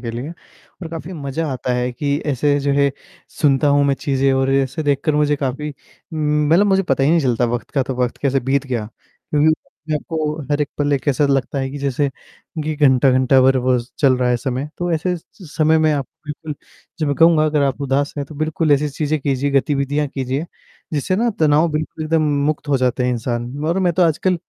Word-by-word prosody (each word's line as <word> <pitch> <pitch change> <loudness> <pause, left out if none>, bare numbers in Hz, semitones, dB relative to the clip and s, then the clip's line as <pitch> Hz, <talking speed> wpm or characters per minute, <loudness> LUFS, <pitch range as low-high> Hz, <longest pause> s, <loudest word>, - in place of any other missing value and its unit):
के 115 +1 -5
लिए। 140 +5 -6 0.5
और 165 - -5
काफ़ी 165 +2 -7
मजा 150 0 -3
आता 125 0 -2
है 125 0 -1
कि 140 +3 -1
ऐसे 145 +1 +1
जो 140 0 0
है 140 0 +3 0.5
सुनता 145 -1 +3
हूँ 145 0 +4
मैं 140 -1 +2
चीजें 135 0 0
और 135 0 +1
ऐसे 135 +2 0
देखकर 145 +1 +1
मुझे 150 0 +2
काफ़ी 140 +2 -3
उम, 150 +1 -3
मतलब 175 +6 +4
मुझे 195 -1 +3
पता 135 -7 0
ही 145 - +3
नहीं 170 0 +4
चलता 125 -4 +1
वक़्त 120 -1 -3
का, 135 - +1
तो 130 0 -4
वक़्त 125 - -1
कैसे 135 -1 +2
बीत 135 +2 0
गया। 120 -5 -2
क्योंकि 150 +1 -1 0.6
को 155 -1 -2
हर 145 0 +1
एक 145 - 0
पल 145 0 +1 0.2
ऐसा 145 +1 +2
लगता 135 0 0
है 135 0 -1
कि 145 - -6
जैसे 140 0 0 0.6
कि 155 0 -2
घंटा-घंटा 130 -2 +4
भर 130 0 +4
बस 125 -1 0
चल 135 -4 +4
रहा 125 -1 +1
है 125 - +2
समय, 130 +3 -3
तो 175 0 -1
ऐसे 170 +3 0
स - - -11 0.4
समय 160 0 +4
में 155 0 +3
आप 140 -3 -2 0.2
बिल्कुल 150 +1 -6 0.4
जो 155 - 0
मैं 145 - +1
कहूँगा 165 -2 +5
अगर 150 -1 +1
आप 140 0 0
उदास 140 +1 0
हैं, 140 - -2
तो 155 - -11
बिल्कुल 155 +1 0
ऐसी 145 +1 +2
चीज़ें 150 +2 -1
कीजिए, 140 0 0
गतिविधियाँ 140 +1 +1
कीजिए, 135 +3 -3 0.5
जिससे 160 +5 0
ना 235 +2 +1
तनाव 155 +2 +4
बिल्कुल 155 +1 -3
एकदम 160 0 +1 0.2
मुक्त 150 -1 -2
हो 140 - +3
जाता 125 0 0
है - - +1
इंसान 120 0 -3
और 170 +3 +1
मैं 180 -2 +2
तो 180 +2 +2
आजकल 170 +3 +2
145 Hz, 215 wpm, -19 LUFS, 135-155 Hz, 0.6 s, कहूँगा